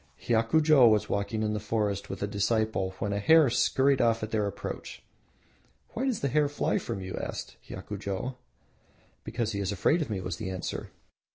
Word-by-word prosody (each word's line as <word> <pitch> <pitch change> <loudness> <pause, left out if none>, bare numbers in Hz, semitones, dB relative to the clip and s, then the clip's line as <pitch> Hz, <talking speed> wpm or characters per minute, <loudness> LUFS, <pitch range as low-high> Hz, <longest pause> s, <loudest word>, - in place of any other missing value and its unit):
Hiakujo 125 +3 +4
was 105 -1 +2
walking 100 +2 -1
in 105 0 0
the 105 - -1
forest 105 -2 -1
with 95 - -5
a - - 0
disciple 100 -2 0
when 100 -2 -2
a 100 - -1
hare 155 +4 +5
scurried 135 +2 +3
off 115 -1 +2
at 110 - -4
their 105 -2 +1
approach. 100 - -6 0.9
"Why 255 - -3
does 250 -6 -1
the 140 - +1
hare 145 +2 +2
fly 145 - 0
from 95 - -5
you?" 95 0 -5
asked - - -6
Hiakujo. 105 +4 -5 0.9
"Because 115 0 -2
he 100 - -3
is 100 0 -1
afraid 105 - +2
of 150 - -3
me," 100 -3 -2
was 90 -2 -4
the 110 -4 -4
answer. 95 -1 -4
110 Hz, 185 wpm, -28 LUFS, 100-125 Hz, 0.9 s, hare